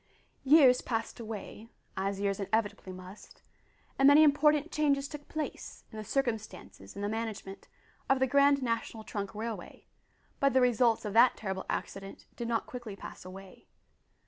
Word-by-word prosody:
Years 270 -3 +6
passed 230 -1 -3
away 220 0 -7 0.3
as 195 +1 -2
years 200 0 -1
inevitably 205 -1 -2
must 185 +2 -12 0.6
and 270 - +6
many 290 +2 +8
important 300 +1 +3
changes 280 -2 +1
took 290 0 -10
place 310 -1 -6
in 220 - -9
the - - -5
circumstances 220 - -4
and 200 - -5
the - - 0
management 220 -3 -5 0.4
of 270 - +4
the 260 - +2
Grand 280 +1 +4
National 230 -2 -3
Trunk 205 -1 -5
Railway, 225 +1 -6 0.5
but 275 -1 +3
the 260 - +5
results 240 -2 +3
of 205 - -3
that 235 +3 +5
terrible 190 -2 -4
accident 195 0 -5
did 235 - -4
not 230 -1 0
quickly 240 -5 -8
pass - - -10
away. 185 +1 -12
225 Hz, 155 wpm, -30 LUFS, 200-270 Hz, 0.6 s, many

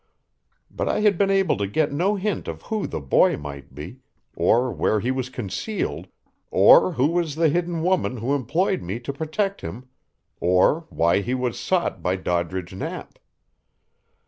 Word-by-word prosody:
But - - -2
I - - 0
had 210 -2 +4
been 195 +3 +2
able 195 - +2
to 100 0 -1
get 145 +9 0
no 180 +8 +1
hint 205 +1 -2
of - - -6
who 220 -2 -2
the - - -4
boy 70 -2 +3
might 70 -2 -9
be, 80 - -9 0.4
or 125 +2 +2
where 110 - +1
he 120 +6 -1
was 130 -1 -3
concealed, 130 - -4 0.4
or 185 - +6
who 130 -3 +1
was 165 -1 0
the 165 0 +3
hidden 170 +1 -1
woman 180 -8 +1
who 120 +5 -1
employed 160 - 0
me 95 +6 -4
to 130 +3 -5
protect 165 +7 -2
him, 120 +10 -8 0.5
or 90 - +2
why 85 +4 +2
he 125 +5 -2
was 125 -4 -2
sought - - -1
by 90 - 0
Doddridge 90 0 -2
Knapp. 95 - -7
130 Hz, 170 wpm, -23 LUFS, -, 0.5 s, or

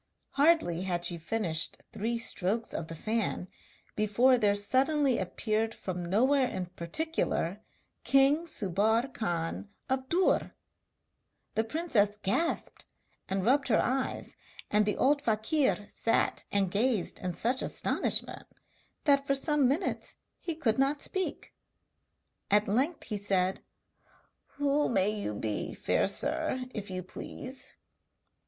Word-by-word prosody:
Hardly 280 - +3
had 175 -2 0
she 170 -1 +2
finished 165 -3 -1
three 230 +3 -2
strokes 225 -1 -1
of 165 - -4
the 165 - -7
fan 215 0 -2 0.5
before 215 +5 +4
there 210 -4 +3
suddenly 265 +6 +2
appeared 215 +4 -1
from 180 -2 -5
nowhere 260 +7 +3
in 185 -1 -3
particular, 185 - -2 0.4
king 280 +5 +4
Subbar 220 - +1
Khan 175 0 -3 0.2
of 265 0 -1
Dûr! 360 +2 +2 1.0
The 220 - +1
princess 225 -7 0
gasped 325 - -1 0.4
and 190 0 -1
rubbed 275 +4 +3
her 225 - +3
eyes, 265 +1 -1 0.4
and 210 0 +3
the 210 - 0
old 285 +2 +3
fakir 225 0 +1
sat 230 - 0
and 195 -3 +1
gazed 215 -2 +1
in 180 -2 -4
such 245 +8 +1
astonishment - - -1 0.6
that 280 -2 +3
for 275 - +3
some 290 -1 +3
minutes 290 +9 -1 0.2
he 335 -3 -4
could 250 -7 0
not 280 +2 +1
speak. 380 -1 -3 1.0
At 210 +1 +3
length 270 - 0
he 210 - -3
said: 190 -2 +1 1.0
'Who 290 +1 +1
may 195 -3 +3
you 205 - -3
be, 105 0 -3
fair - - +1
sir, 260 -1 0
if 205 -3 -5
you 185 -1 -4
please?' 255 +7 -8
225 Hz, 125 wpm, -30 LUFS, 195-275 Hz, 1.0 s, before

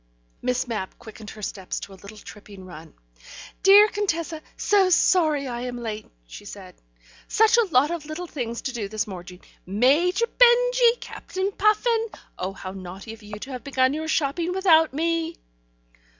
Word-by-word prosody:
Miss 250 0 -1
Mapp 215 -5 -5
quickened 220 -1 -11
her 215 0 -11
steps 190 -1 -4
to 195 - -9
a 190 - -16
little 205 +2 -12
tripping 205 -2 -12
run. 160 -3 -12 0.7
"Dear 405 +2 +8
Contessa, 335 -6 -2 0.2
so 395 -2 +3
sorry 315 -5 +3
I 240 -1 -4
am 245 0 -5
late," 220 -3 -6 0.2
she - - -11
said. - - -10 0.5
"Such 445 +1 +4
a 470 - +3
lot 285 +3 +4
of 330 -4 -5
little 310 +4 -5
things 240 -8 -5
to 265 - -3
do 220 -5 -3
this 215 +1 -2
morning. 180 -2 -10 0.2
(Major 295 - +2
Benjy! - - +4
Captain 380 +2 -4
Puffin!) 445 +3 +2 0.3
Oh, 185 +1 -3
how 190 -1 -8
naughty 190 +3 -9
of 225 - -14
you 210 0 -9
to 275 - -7
have 250 -1 -7
begun 265 -1 +1
your 315 +1 -4
shopping 325 +3 0
without 330 -4 +4
me!" 330 +3 -1
275 Hz, 165 wpm, -24 LUFS, -, 0.7 s, Dear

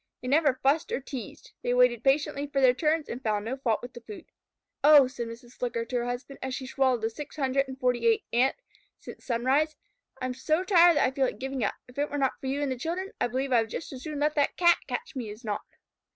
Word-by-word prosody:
They 250 - -8
never 285 -1 +3
fussed 280 +4 +2
or - - 0
teased. 260 -5 -8
They 245 - 0
waited 250 -2 +4
patiently 285 +1 +1
for 280 -1 -1
their 255 -2 +6
turns 310 +3 0
and 240 - -6
found 210 -3 -1
no 245 +4 -2
fault 235 -5 0
with 250 +1 -8
the 240 - -10
food. 215 -2 -10 0.6
"Oh," 290 -2 +8
said 245 -3 -5
Mrs. 235 +1 -11
Flicker 235 -2 -3
to 250 +2 -6
her 240 - -1
husband, 250 +3 -5
as 260 -1 -3
she 260 - -6
swallowed 260 -2 +1
the 225 - 0
six 295 +5 -8
hundred 275 -1 +1
and 265 0 -8
forty 250 - +1
eighth 445 -2 +2
Ant 250 +3 +3 0.4
since - - -11
sunrise. 265 +6 +1 0.4
"I - - -3
am 255 - -2
so 310 +7 0
tired 350 -4 +6
that - - +4
I 255 - +1
feel 270 0 +1
like - - -5
giving 265 0 -3
up. 200 - 0
If 250 +3 -10
it 290 - 0
were 290 - -3
not 270 -2 0
for 265 - -6
you 280 +2 -1
and 275 - -1
the 255 - -4
children, 360 +7 -3
I - - +3
believe 260 +3 -2
I 240 -2 +5
would 225 - -5
just 320 - -6
as 255 - -8
soon 305 -1 -5
let 300 +1 +2
that 290 -2 +1
Cat 345 -1 +5
catch 475 -9 -5
me 240 -5 -4
as 215 +4 -10
not." 210 -1 -2
265 Hz, 260 wpm, -28 LUFS, 245-290 Hz, 0.6 s, Oh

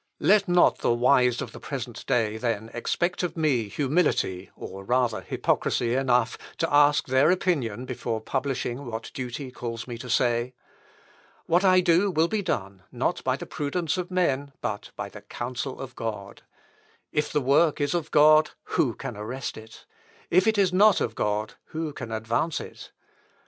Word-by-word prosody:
"Let 205 0 +4
not 175 0 +4
the 120 - +2
wise 125 0 +3
of - - -8
the - - -10
present 125 -4 -6
day, 110 -2 +1
then, 115 -1 -2
expect 175 +9 -1
of 180 -1 -3
me 135 -9 +1
humility, 135 - 0
or 95 0 -8
rather 120 -1 +1
hypocrisy 115 +5 0
enough, 125 -3 +1 0.2
to 165 -2 -1
ask 145 0 +5
their 130 +4 +3
opinion 140 - 0
before 120 -3 -3
publishing 130 +1 -3
what 115 0 -6
duty 130 +1 -5
calls 115 -2 -5
me 120 -2 -6
to 125 - -8
say. 120 +1 +1 0.9
What 175 +3 +2
I 185 -1 +6
do 180 +3 +3
will 165 -2 +2
be 215 +3 -1
done, 100 - -3
not - - -1
by - - +1
the - - -7
prudence 155 +2 -2
of 180 -1 -3
men, 145 -7 0
but - - -4
by - - -4
the - - -11
counsel 125 +2 -5
of 130 -1 -8
God. 105 -4 -6 0.7
If 150 - -1
the - - +2
work 145 +4 +3
is 145 +2 0
of 165 -3 -2
God, 155 +1 +6 0.2
who 120 -6 +2
can 135 -5 -6
arrest 120 +5 -5
it? 110 0 -13 0.5
If 185 +4 +4
it 220 -1 +3
is 190 -2 +3
not 205 +1 +5
of 115 - -1
God, 105 0 -1 0.2
who 160 -1 -3
can 120 -5 -7
advance 115 +8 -1
it?... - - -10
130 Hz, 170 wpm, -26 LUFS, 115-160 Hz, 0.9 s, I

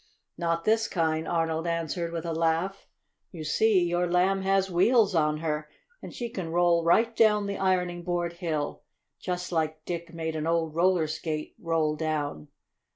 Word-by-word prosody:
"Not 165 0 -1
this 220 0 +3
kind," 160 -2 0
Arnold 165 0 -1
answered, 170 0 -2
with 170 -1 -4
a 165 - -2
laugh. 165 +4 -1 0.4
"You 165 -4 -7
see 190 +5 +3
your 175 0 0
Lamb 185 +2 +2
has 195 0 +1
wheels 205 +3 +4
on 150 -2 +2
her, 150 -1 -2 0.3
and - - -8
she 240 - -4
can 190 -7 -5
roll 170 0 +3
right 225 +7 +3
down 210 -2 +4
the 200 0 -4
ironing 180 -2 0
board 175 -1 -2
hill, 160 -4 -3 0.4
just 180 -1 -4
like 155 -2 -1
Dick 170 -1 -5
made 160 -1 -4
an 155 0 -2
old 165 -2 0
roller 175 0 +3
skate 155 0 -4
roll 160 -3 0
down. 150 - -3
170 Hz, 165 wpm, -27 LUFS, 160-185 Hz, 0.4 s, wheels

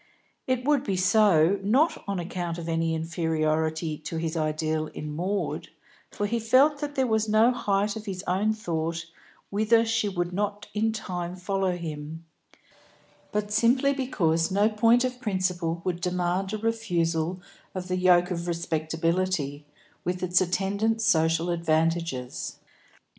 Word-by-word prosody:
It 255 -1 0
would 290 -2 +3
be 195 - -1
so, 190 -2 +4
not 255 +12 +2
on 200 -1 -1
account 175 -1 -4
of 170 -1 -6
any 165 0 0
inferiority 160 -1 -1
to 155 +1 -5
his 160 0 -2
ideal 155 0 -1
in 150 0 -7
Maud, 190 +5 -2 0.4
for 205 - -3
he 230 +3 0
felt 265 +6 +4
that 290 -1 -4
there 265 - +2
was 220 -2 +1
no 220 +3 +5
height 205 -3 0
of 220 0 -8
his 190 -1 -4
own 195 +4 +1
thought 170 -5 -3 0.5
whither 220 +3 +3
she 225 -2 +1
would 175 -2 -2
not 205 +1 -2
in 220 +2 +1
time 180 -5 -4
follow 185 0 -1
him; 160 0 -6 1.1
but 210 0 -2
simply 250 +5 +3
because 170 - +1
no 200 +3 +3
point 230 +3 +4
of 250 0 -3
principle 180 -6 -1
would 175 -2 -2
demand 180 +2 -1
a 215 - -2
refusal 180 -6 -1 0.4
of 185 -1 -4
the 185 - -1
yoke 180 0 +4
of 170 -1 -3
respectability, 165 -2 -1 0.4
with 180 +1 -2
its 180 0 +3
attendant 200 +5 0
social 165 -4 +2
advantages. 165 -5 -1
180 Hz, 145 wpm, -26 LUFS, 165-215 Hz, 1.1 s, no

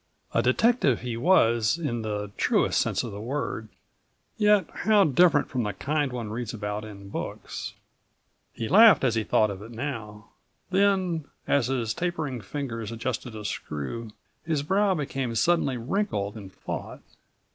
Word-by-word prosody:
A - - +3
detective 140 - +3
he 120 -1 -3
was 115 - +3
in 125 -9 -2
the 105 -2 -3
truest - - +2
sense - - 0
of - - -5
the 100 +1 -7
word, 120 -3 -3 0.7
yet 210 -4 +4
how 215 -2 +4
different 155 0 +4
from 130 - -2
the 105 -2 -2
kind 145 -2 -1
one 115 -4 -5
reads 115 +1 -4
about 105 -1 -4
in 100 -2 -10
books. - - -5 0.8
He 115 - -4
laughed 205 - +7
as 125 -4 +3
he 110 -1 0
thought 110 0 +2
of 100 0 -7
it 110 - -9
now. 115 -4 -6 0.4
Then 190 -5 +2 0.2
as 140 -4 +2
his 120 -4 -1
tapering 155 -6 -3
fingers 115 -1 -5
adjusted 115 0 -4
a 105 -1 -7
screw, 100 - -4 0.3
his 155 -3 -1
brow 195 +4 +2
became 135 -5 -3
suddenly 140 -1 +2
wrinkled 115 - -2
in 100 -3 -9
thought. - - -7
125 Hz, 155 wpm, -26 LUFS, 110-160 Hz, 0.8 s, laughed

